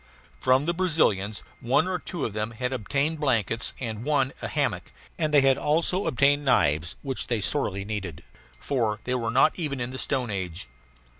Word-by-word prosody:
From 130 Hz, -, +3 dB
the 170 Hz, -, +1 dB
Brazilians 150 Hz, -, +1 dB, 0.2 s
one 130 Hz, +8 st, +2 dB
or 185 Hz, -1 st, -1 dB
two 170 Hz, -2 st, -4 dB
of 110 Hz, -, -4 dB
them 110 Hz, +2 st, -2 dB
had 125 Hz, +2 st, -1 dB
obtained 140 Hz, +7 st, -1 dB
blankets, 115 Hz, -5 st, +1 dB
and 115 Hz, -3 st, -4 dB
one 140 Hz, -2 st, +1 dB
a -, -, -3 dB
hammock; -, -, -1 dB, 0.2 s
and 155 Hz, -2 st, -1 dB
they 145 Hz, -2 st, +6 dB
had 135 Hz, -1 st, +3 dB
also 170 Hz, +6 st, +1 dB
obtained 140 Hz, +3 st, +3 dB
knives, 80 Hz, -, +2 dB
which 135 Hz, -5 st, -2 dB
they 120 Hz, -3 st, 0 dB
sorely 100 Hz, -4 st, -1 dB
needed, 100 Hz, -7 st, -5 dB, 0.4 s
for 115 Hz, -6 st, -1 dB
they 125 Hz, -, -2 dB
are 120 Hz, -3 st, -1 dB
not 130 Hz, +6 st, +4 dB
even 145 Hz, -5 st, -2 dB
in 120 Hz, +1 st, -3 dB
the 130 Hz, -, -5 dB
stone 125 Hz, -5 st, 0 dB
age. 90 Hz, -5 st, -3 dB
130 Hz, 180 wpm, -26 LUFS, 110-145 Hz, 0.4 s, they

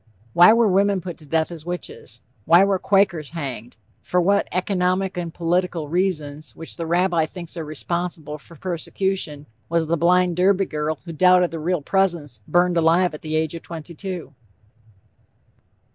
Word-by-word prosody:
Why 175 Hz, +5 st, +8 dB
were 230 Hz, 0 st, +4 dB
women 200 Hz, 0 st, +2 dB
put 175 Hz, -1 st, -7 dB
to 155 Hz, -, -13 dB
death 160 Hz, +2 st, 0 dB
as 165 Hz, -3 st, -8 dB
witches? 175 Hz, -9 st, -7 dB, 0.2 s
Why 170 Hz, +4 st, +6 dB
were 195 Hz, -1 st, +1 dB
Quakers 190 Hz, -7 st, +2 dB
hanged? 125 Hz, -6 st, -6 dB, 0.2 s
For 180 Hz, -, 0 dB
what 200 Hz, +3 st, +2 dB
"economic 185 Hz, 0 st, 0 dB
and 175 Hz, -2 st, -4 dB
political 170 Hz, -2 st, -1 dB
reasons," 155 Hz, -4 st, -2 dB
which 165 Hz, -, -9 dB
the 165 Hz, -2 st, -5 dB
Rabbi 170 Hz, -1 st, +2 dB
thinks 170 Hz, 0 st, -9 dB
are 165 Hz, -, -4 dB
responsible 155 Hz, 0 st, -4 dB
for 170 Hz, -, -15 dB
persecution, 175 Hz, -2 st, -3 dB, 0.2 s
was 165 Hz, -1 st, +1 dB
the 170 Hz, +2 st, 0 dB
blind 175 Hz, +1 st, +3 dB
Derby 195 Hz, +1 st, +3 dB
girl 150 Hz, -1 st, -2 dB
who 170 Hz, -, -7 dB
doubted 180 Hz, +1 st, +4 dB
the 165 Hz, -, -5 dB
Real 170 Hz, 0 st, -1 dB
Presence, 170 Hz, -, 0 dB
burned 175 Hz, 0 st, +2 dB
alive 170 Hz, +2 st, +3 dB
at 150 Hz, -, -8 dB
the 155 Hz, 0 st, -3 dB
age 160 Hz, 0 st, 0 dB
of 165 Hz, -, -7 dB
twenty 165 Hz, 0 st, -9 dB
two? 180 Hz, -2 st, -6 dB
170 Hz, 165 wpm, -22 LUFS, 155-185 Hz, 0.2 s, Why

